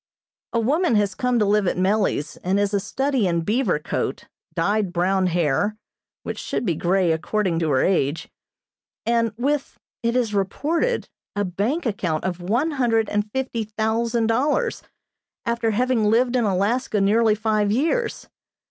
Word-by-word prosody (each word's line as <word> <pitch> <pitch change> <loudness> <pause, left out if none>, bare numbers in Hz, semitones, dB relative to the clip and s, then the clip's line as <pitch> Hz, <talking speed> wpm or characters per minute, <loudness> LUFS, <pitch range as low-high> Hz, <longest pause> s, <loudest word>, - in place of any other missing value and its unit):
A 230 - +1
woman 290 +5 +2
has 205 -1 +2
come 250 -2 0
to 215 - +3
live 205 -1 +2
at - - 0
Mellie's, 190 -5 +1
and 190 +3 0
is 205 0 0
a 200 - +3
study 265 +2 0
in 170 -1 +1
beaver 210 - +1
coat, 150 - -3 0.3
dyed 200 +2 +1
brown 185 +1 +1
hair 175 +5 +1 0.5
(which - - -5
should - - -3
be 175 - +1
grey, 175 +2 +1
according 175 +2 0
to 165 -2 0
her 130 -2 +3
age), 165 -5 0 0.8
and 230 -1 +2
with, 280 +3 -1 0.2
it 235 +1 0
is 235 -4 +1
reported, 305 - 0 0.3
a 205 0 0
bank 210 - -1
account 175 -8 -1
of 180 -1 -3
one 240 - 0
hundred 230 -6 +1
and 210 0 -1
fifty 255 -3 -2
thousand 225 +2 0
dollars, 285 - +1 0.6
after 235 -1 0
having 240 0 +1
lived 240 +4 +3
in 240 -3 +2
Alaska 210 +4 0
nearly 215 +2 +3
five 215 -1 +1
years. 330 - 0
215 Hz, 155 wpm, -23 LUFS, 190-240 Hz, 0.8 s, to